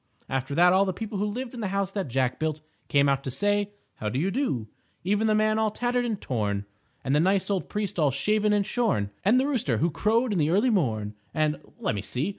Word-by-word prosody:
After 135 +2 -2
that 180 +2 +6
all 190 +1 +5
the 190 -1 -1
people 210 +1 -5
who 205 - +1
lived 240 +4 -4
in 245 - -7
the 210 - -1
House 195 0 -1
that 195 -4 -3
Jack 130 0 0
Built 155 -1 -2 0.3
came 140 0 +3
out 140 0 +1
to 135 - -3
say 205 +9 0 0.3
"How 105 - -2
do 125 - -3
you 180 +8 0
do," 195 - -1 0.4
even 205 +4 +1
the 215 - +3
Man 215 0 +2
All 220 -1 +2
Tattered 245 +3 -1
and 220 -4 -2
Torn, 105 -5 -2 0.4
and 135 +2 +1
the - - +4
nice 190 +4 +2
old 190 -2 -1
Priest 205 -4 -3
All 150 -3 +4
Shaven 210 +11 +1
and 205 -1 +2
Shorn, 210 - 0
and 220 +7 +4
the 265 - +2
Rooster 235 - 0
Who 170 +8 +1
Crowed 225 - +1
in 185 - 0
the 150 0 +2
Early 210 +9 +3
Morn. 110 - 0 0.2
And, 155 -2 +1 0.2
let - - 0
me 100 - -3
see! 125 - -2
190 Hz, 240 wpm, -26 LUFS, 140-215 Hz, 0.4 s, that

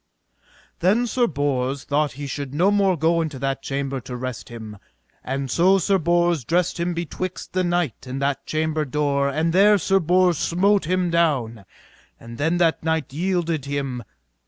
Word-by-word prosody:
Then 205 +8 +3
Sir 240 0 +1
Bors 140 -2 -1
thought 145 +1 0
he 145 +2 -7
should 140 0 -5
no 185 +6 +3
more 195 -3 +2
go 165 +2 +2
into 155 -4 -4
that 135 +1 -2
chamber 135 -1 -3
to 125 - -7
rest 125 -2 -6
him, 110 -3 -9 0.4
and 135 0 -3
so 185 +3 +4
Sir 195 +1 +2
Bors 170 -2 +2
dressed 175 +6 0
him 175 0 -1
betwixt 175 +2 -5
the 185 0 +1
knight 175 - -1
and 130 +2 -4
that 140 0 -2
chamber 155 0 -1
door, 140 0 0
and 160 +4 0
there 205 +3 +6
Sir 195 +1 +2
Bors 180 -1 +2
smote 195 +2 +2
him 180 +1 0
down, 130 -11 0 0.5
and 115 +2 -11
then 160 +4 +1
that 170 -2 +2
knight 160 -4 -1
yielded 170 -3 -1
him. 140 -3 -3
160 Hz, 170 wpm, -22 LUFS, 140-175 Hz, 0.5 s, there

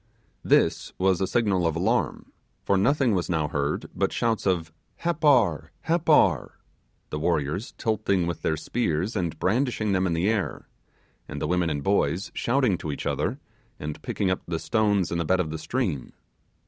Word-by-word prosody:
This - - +2
was 95 -1 +2
a 95 - +1
signal 95 -5 +1
of 80 - -1
alarm; 85 +3 0 0.3
for 100 - +2
nothing 125 +4 +3
was 90 -2 -1
now 80 -4 +1
heard 70 0 -1
but - - 0
shouts 115 -3 0
of 85 -4 0 0.3
'Happar! 145 - +2
Happar!' 155 - +2 0.5
the 75 - -2
warriors 80 - -1
tilting 100 -5 0
with 85 -2 -3
their 80 - 0
spears 90 +3 -1
and 85 -5 -2
brandishing 110 - 0
them 95 -1 +2
in 85 - 0
the 85 +4 +1
air, 105 -3 -1 0.6
and - - -6
the - - -2
women 90 0 +1
and 75 -2 -2
boys 100 0 +1
shouting 120 -7 +1
to 75 - -4
each - - -6
other, - - -1 0.4
and 75 0 -6
picking 95 -2 -1
up 95 - -1
the 85 -1 -1
stones 105 -3 +1
in 85 - -1
the - - +1
bed 95 +4 +2
of 80 -4 -1
the 80 - -4
stream. 80 - -2
95 Hz, 175 wpm, -26 LUFS, 80-110 Hz, 0.6 s, nothing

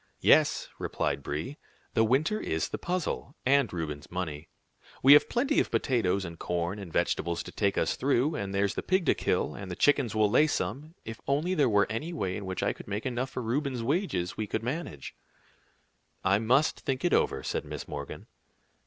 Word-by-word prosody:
"Yes," - - +4
replied - - -1
Brie; 75 - -4 0.3
"the 110 - +4
winter 145 - +2
is 80 - -2
the - - -4
puzzle, 175 -4 -3
and 135 -4 +3
Reuben's 75 -4 -5
money. 80 -4 -5 0.5
We 135 +2 +10
have 145 - +6
plenty 270 +5 +2
of - - +1
potatoes 100 -7 +1
and 85 -1 -8
corn 90 +3 -2
and 95 -4 -8
vegetables 85 +1 0
to - - -9
take 100 -2 0
us - - +1
through, 140 +2 +1
and 100 -10 -3
there's 100 0 +1
the - - -3
pig 185 -1 +1
to - - +4
kill, - - 0
and 100 -2 -8
the 90 - -4
chickens 140 -3 +2
will 110 -1 +4
lay 130 +9 +4
some; 155 +2 -3
if 115 0 -7
only 150 +7 +1
there 145 -8 +3
were 105 -1 +4
any 115 +11 -4
way 95 - -2
in 100 - -5
which 95 -1 -3
I - - +1
could - - -12
make 105 +1 -3
enough 130 +1 -2
for 125 - -5
Reuben's 130 +1 -1
wages, 140 - -1
we 110 - -3
could 110 +2 -2
manage." 120 - -4 1.1
"I 95 +1 +3
must 130 +7 +2
think 135 +3 -2
it 175 - +2
over," - - +2
said - - -2
Miss - - -7
Morgan. - - -7
115 Hz, 195 wpm, -29 LUFS, 95-145 Hz, 1.1 s, We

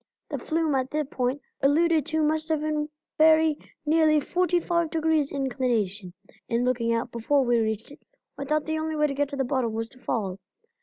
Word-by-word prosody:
The - - -3
flume 320 -2 0
at 260 -1 0
the 305 +1 -1
point 260 +1 -2 0.2
alluded 315 +2 +3
to 315 0 +1
must 310 +1 0
have 315 -2 +1
been 305 -1 -1 0.3
very 315 0 +5 0.3
nearly 310 0 +4
forty 355 +4 +1
five 340 -1 0
degrees 315 -2 +1
inclination. 240 -9 -1 0.4
In 235 +1 +1
looking 235 -2 +1
out, 230 +1 -1
before 265 +4 +1
we 240 -1 +3
reached 220 +2 -2
it, 290 - -13 0.4
I 280 - -5
thought 305 +1 0
the 315 0 -1
only 315 0 -2
way 300 0 +2
to 285 - -1
get 285 0 0
to 280 - -5
the 270 - 0
bottom 250 -3 -1
was 225 +1 -3
to 255 - -19
fall. 200 -6 -2
290 Hz, 200 wpm, -26 LUFS, 245-315 Hz, 0.4 s, very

